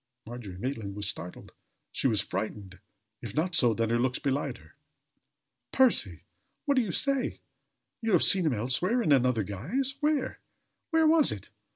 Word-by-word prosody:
Margery 110 Hz, -5 st, -8 dB
Maitland 110 Hz, -3 st, -4 dB
was 105 Hz, -1 st, -3 dB
startled 90 Hz, -3 st, -6 dB, 0.4 s
she -, -, 0 dB
was 110 Hz, -5 st, +2 dB
frightened. 100 Hz, -4 st, -5 dB, 0.4 s
If 115 Hz, -4 st, -7 dB
not 175 Hz, +4 st, 0 dB
so, 120 Hz, -8 st, +4 dB
then 115 Hz, 0 st, 0 dB
her 120 Hz, -, +2 dB
looks 125 Hz, 0 st, +1 dB
belied 140 Hz, +1 st, -2 dB
her. -, -, -20 dB, 1.0 s
"Percy! 260 Hz, -2 st, +2 dB, 0.4 s
What 285 Hz, -, +3 dB
do 260 Hz, -, +3 dB
you 220 Hz, -, -3 dB
say? 275 Hz, +5 st, 0 dB, 0.6 s
You 225 Hz, -2 st, 0 dB
have 175 Hz, -, +5 dB
seen 185 Hz, -4 st, +5 dB
him 145 Hz, -, +2 dB
elsewhere 175 Hz, -, 0 dB
in 155 Hz, -, +1 dB
another 125 Hz, -5 st, +3 dB
guise? 170 Hz, -, -2 dB
Where? 295 Hz, -3 st, 0 dB, 0.5 s
Where 320 Hz, -1 st, +3 dB
was 315 Hz, -1 st, +5 dB
it?" -, -, -8 dB
135 Hz, 165 wpm, -28 LUFS, -, 1.0 s, have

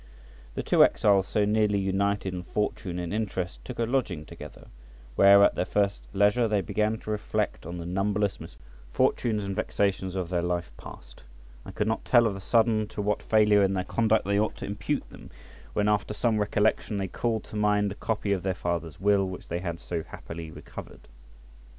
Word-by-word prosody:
The -, -, -3 dB
two -, -, +5 dB
exiles 100 Hz, -2 st, +3 dB
so 105 Hz, -, +1 dB
nearly 105 Hz, -1 st, +2 dB
united 100 Hz, 0 st, 0 dB
in 90 Hz, -, -4 dB
fortune 90 Hz, -1 st, -3 dB
and 90 Hz, +1 st, -4 dB
interest 95 Hz, -5 st, -3 dB
took 125 Hz, -, -8 dB
a 115 Hz, -, +1 dB
lodging 115 Hz, -, -1 dB
together, -, -, -11 dB, 0.5 s
where 100 Hz, 0 st, +7 dB
at -, -, +5 dB
their -, -, 0 dB
first 100 Hz, +2 st, 0 dB
leisure 105 Hz, +4 st, +3 dB
they 105 Hz, -2 st, +1 dB
began 105 Hz, +4 st, 0 dB
to 110 Hz, -, -6 dB
reflect 105 Hz, -6 st, -2 dB
on 85 Hz, +1 st, -5 dB
the 85 Hz, -, -6 dB
numberless 100 Hz, +3 st, 0 dB
misfortunes 60 Hz, -, -2 dB
and 100 Hz, -1 st, -4 dB
vexations 95 Hz, -2 st, -1 dB
of 90 Hz, -3 st, -3 dB
their 90 Hz, -1 st, 0 dB
life 85 Hz, -4 st, -2 dB
past, -, -, -12 dB, 0.4 s
and -, -, -10 dB
could 105 Hz, -, 0 dB
not 110 Hz, -, -1 dB
tell 120 Hz, -2 st, +5 dB
of 110 Hz, -, +1 dB
the 95 Hz, -, -8 dB
sudden 110 Hz, 0 st, +2 dB
to -, -, -9 dB
what 105 Hz, 0 st, 0 dB
failure 105 Hz, -2 st, +4 dB
in 95 Hz, 0 st, +2 dB
their 90 Hz, -, 0 dB
conduct 110 Hz, +2 st, +1 dB
they 100 Hz, +1 st, +1 dB
ought 110 Hz, -, 0 dB
to -, -, -7 dB
impute 100 Hz, 0 st, -3 dB
them, -, -, -12 dB, 0.4 s
when, 105 Hz, 0 st, +1 dB
after 105 Hz, 0 st, 0 dB
some 110 Hz, -2 st, +1 dB
recollection, 105 Hz, 0 st, +1 dB
they 95 Hz, -1 st, -2 dB
called 110 Hz, +3 st, -2 dB
to -, -, -11 dB
mind 105 Hz, -1 st, +2 dB
the -, -, -3 dB
copy 105 Hz, -1 st, -2 dB
of 95 Hz, -2 st, +1 dB
their 95 Hz, 0 st, -1 dB
father's 85 Hz, -3 st, -3 dB
will 100 Hz, 0 st, +3 dB
which 90 Hz, -, -9 dB
they 85 Hz, -, -2 dB
had 85 Hz, -2 st, -4 dB
so 85 Hz, -2 st, -4 dB
happily 80 Hz, 0 st, -8 dB
recovered. -, -, -11 dB
100 Hz, 195 wpm, -27 LUFS, 90-105 Hz, 0.5 s, where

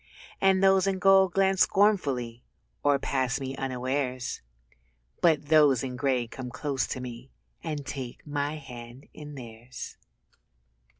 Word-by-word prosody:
And 190 Hz, 0 st, +4 dB
those 195 Hz, 0 st, +5 dB
in 195 Hz, -1 st, +1 dB
gold 190 Hz, 0 st, +5 dB
glance 195 Hz, -1 st, +3 dB
scornfully 140 Hz, -, +2 dB, 0.4 s
Or 145 Hz, -1 st, +3 dB
pass 130 Hz, -1 st, -1 dB
me 135 Hz, 0 st, -4 dB
unawares; 130 Hz, -1 st, -2 dB, 0.8 s
But 155 Hz, -4 st, +3 dB
those 145 Hz, -5 st, +5 dB
in 130 Hz, -1 st, -4 dB
grey 130 Hz, -2 st, +1 dB
come 125 Hz, +2 st, -7 dB
close 135 Hz, +1 st, -2 dB
to -, -, -4 dB
me 125 Hz, +1 st, -8 dB, 0.3 s
And 150 Hz, -4 st, -4 dB
take 130 Hz, -4 st, -7 dB
my 145 Hz, 0 st, -2 dB
hands 125 Hz, -3 st, -10 dB
in 150 Hz, -1 st, -9 dB
theirs. 120 Hz, -1 st, -9 dB
135 Hz, 130 wpm, -28 LUFS, 125-155 Hz, 0.8 s, those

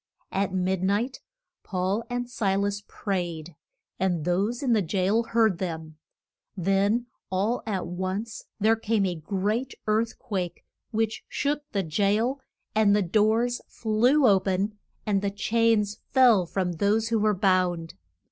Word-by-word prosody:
At 195 Hz, 0 st, 0 dB
mid 185 Hz, 0 st, 0 dB
night 205 Hz, +7 st, 0 dB, 0.4 s
Paul 190 Hz, +3 st, -1 dB
and 245 Hz, 0 st, -2 dB
Si 205 Hz, -6 st, 0 dB
las 200 Hz, +1 st, -1 dB
prayed, 175 Hz, -5 st, -4 dB, 0.4 s
and 175 Hz, -4 st, 0 dB
those 200 Hz, +9 st, 0 dB
in 250 Hz, -3 st, +2 dB
the 215 Hz, -, +3 dB
jail 190 Hz, +5 st, +1 dB
heard 220 Hz, -6 st, +2 dB
them. 160 Hz, -4 st, -5 dB, 0.6 s
Then 195 Hz, +6 st, +2 dB, 0.2 s
all 200 Hz, +6 st, 0 dB
at 195 Hz, -4 st, -1 dB
once 185 Hz, +5 st, -4 dB
there 220 Hz, +2 st, +4 dB
came 225 Hz, -2 st, 0 dB
a 180 Hz, -, 0 dB
great 205 Hz, -, -2 dB
earth 220 Hz, +2 st, 0 dB
quake 185 Hz, -8 st, -4 dB, 0.2 s
which 220 Hz, -1 st, -1 dB
shook 290 Hz, +1 st, -1 dB
the 200 Hz, -2 st, 0 dB
jail, 210 Hz, -, +1 dB, 0.3 s
and 215 Hz, -2 st, +4 dB
the 210 Hz, -, +2 dB
doors 220 Hz, +6 st, +2 dB
flew 240 Hz, +6 st, +2 dB
o 195 Hz, -2 st, +6 dB
pen, 195 Hz, +2 st, -1 dB, 0.3 s
and 200 Hz, -2 st, +1 dB
the 200 Hz, -, 0 dB
chains 210 Hz, 0 st, +1 dB
fell 240 Hz, -9 st, +5 dB
from 185 Hz, 0 st, -1 dB
those 215 Hz, +4 st, +2 dB
who 230 Hz, -1 st, +2 dB
were 210 Hz, 0 st, +2 dB
bound. 180 Hz, -3 st, +1 dB
205 Hz, 145 wpm, -26 LUFS, 185-225 Hz, 0.6 s, o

